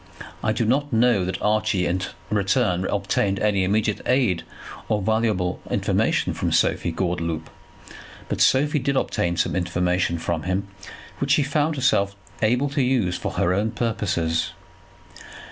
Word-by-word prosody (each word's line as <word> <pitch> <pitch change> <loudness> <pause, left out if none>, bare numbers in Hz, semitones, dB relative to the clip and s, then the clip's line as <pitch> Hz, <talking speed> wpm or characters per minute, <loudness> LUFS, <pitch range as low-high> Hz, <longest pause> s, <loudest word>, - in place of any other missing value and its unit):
I 110 - +2
do 115 +1 0
not 140 +5 +1
know 115 -4 +3
that 95 -1 -3
Archie 105 -3 +1
in 90 +2 0 0.3
return 95 -3 +1
obtained 100 0 0
any 105 -3 +2
immediate 105 +2 0
aid 125 -9 +2 0.5
or 105 - +2
valuable 105 -3 0
information - - +1
from - - -2
Sophie 85 - +2
Gordeloup; 85 -2 -2 0.8
but - - -2
Sophie 145 +3 +3
did 140 +1 -1
obtain 85 -8 0
some 85 0 0
information 90 -1 0
from 80 0 -2
him 95 +4 -2 0.5
which 140 0 +2
she 150 - +3
found 150 +3 0
herself 100 -7 +1 0.3
able 125 +6 +2
to 140 0 0
use 125 -9 +1
for - - -4
her 85 - +1
own 105 +4 +1
purposes. 105 -8 -1
100 Hz, 145 wpm, -23 LUFS, 90-120 Hz, 0.8 s, know